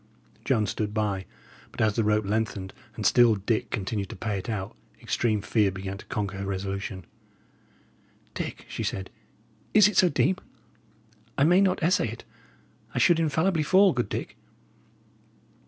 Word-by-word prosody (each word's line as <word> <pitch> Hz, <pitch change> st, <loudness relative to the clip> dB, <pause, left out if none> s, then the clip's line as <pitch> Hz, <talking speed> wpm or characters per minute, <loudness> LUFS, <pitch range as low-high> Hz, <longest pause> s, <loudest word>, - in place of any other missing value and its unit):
Joan 110 Hz, -, +2 dB
stood 105 Hz, +1 st, -3 dB
by; 100 Hz, -3 st, -1 dB, 0.4 s
but -, -, -12 dB
as 110 Hz, -2 st, +2 dB
the 115 Hz, -, +1 dB
rope 105 Hz, 0 st, +2 dB
lengthened, 100 Hz, -2 st, -2 dB, 0.2 s
and -, -, -5 dB
still 120 Hz, -3 st, +5 dB
Dick 105 Hz, +3 st, -1 dB
continued 100 Hz, -1 st, -3 dB
to -, -, -7 dB
pay 100 Hz, 0 st, -3 dB
it 95 Hz, -, -7 dB
out, 100 Hz, -3 st, -4 dB, 0.2 s
extreme 110 Hz, -4 st, 0 dB
fear 110 Hz, -2 st, +2 dB
began 95 Hz, +1 st, -6 dB
to -, -, -12 dB
conquer 100 Hz, -2 st, -3 dB
her 100 Hz, -, -3 dB
resolution. 95 Hz, -1 st, -4 dB, 1.3 s
"Dick," -, -, -5 dB
she -, -, -5 dB
said, 95 Hz, -1 st, -3 dB, 0.6 s
"is 210 Hz, -2 st, +8 dB
it 210 Hz, -, -2 dB
so 180 Hz, -, +6 dB
deep? 180 Hz, +5 st, +1 dB, 1.0 s
I 140 Hz, -, +4 dB
may 175 Hz, +5 st, +5 dB
not 185 Hz, -4 st, +1 dB
essay 170 Hz, -7 st, +3 dB
it. 115 Hz, +1 st, -8 dB, 0.7 s
I -, -, -2 dB
should 170 Hz, -2 st, +4 dB
infallibly 160 Hz, +2 st, +1 dB
fall, 190 Hz, +4 st, +5 dB
good 120 Hz, -2 st, -1 dB
Dick." -, -, -5 dB
110 Hz, 155 wpm, -26 LUFS, 100-145 Hz, 1.3 s, is